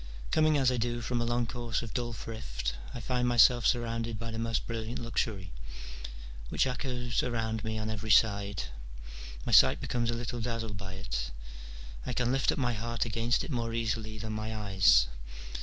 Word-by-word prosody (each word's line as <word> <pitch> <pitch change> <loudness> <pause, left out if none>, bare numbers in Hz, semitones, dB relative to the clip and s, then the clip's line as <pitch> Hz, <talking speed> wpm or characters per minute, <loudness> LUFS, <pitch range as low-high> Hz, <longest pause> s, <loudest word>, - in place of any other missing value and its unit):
Coming 155 -1 +4
as 130 -2 +4
I 125 - 0
do 120 +1 -1
from 120 0 -1
a - - +1
long 120 0 +1
course 120 -1 -2
of 115 - -7
dull 120 -2 -1
thrift, - - -4 0.2
I - - -6
find 125 +1 0
myself 120 0 +6
surrounded 115 -1 0
by 115 +1 -5
the 115 - -4
most 115 0 -1
brilliant 115 0 -3
luxury, 110 - -2 1.0
which - - +2
echoes 125 -2 -1
around 110 -3 -1
me 110 0 -2
on 110 0 -2
every 110 0 -4
side: 100 -2 +4 0.8
my - - -2
sight - - +7
becomes 120 -1 -1
a 115 - +1
little 120 0 -3
dazzled 115 -2 -3
by 95 -1 -6
it: - - -3 0.7
I 125 - -3
can 125 0 +1
lift 135 0 +3
up - - -3
my 120 -3 +1
heart 115 +2 -1
against 115 +1 +1
it - - -6
more 115 -3 -1
easily 110 -1 -2
than 110 +1 -4
my 110 +1 -3
eyes. 95 - +5
115 Hz, 185 wpm, -31 LUFS, 110-120 Hz, 1.0 s, sight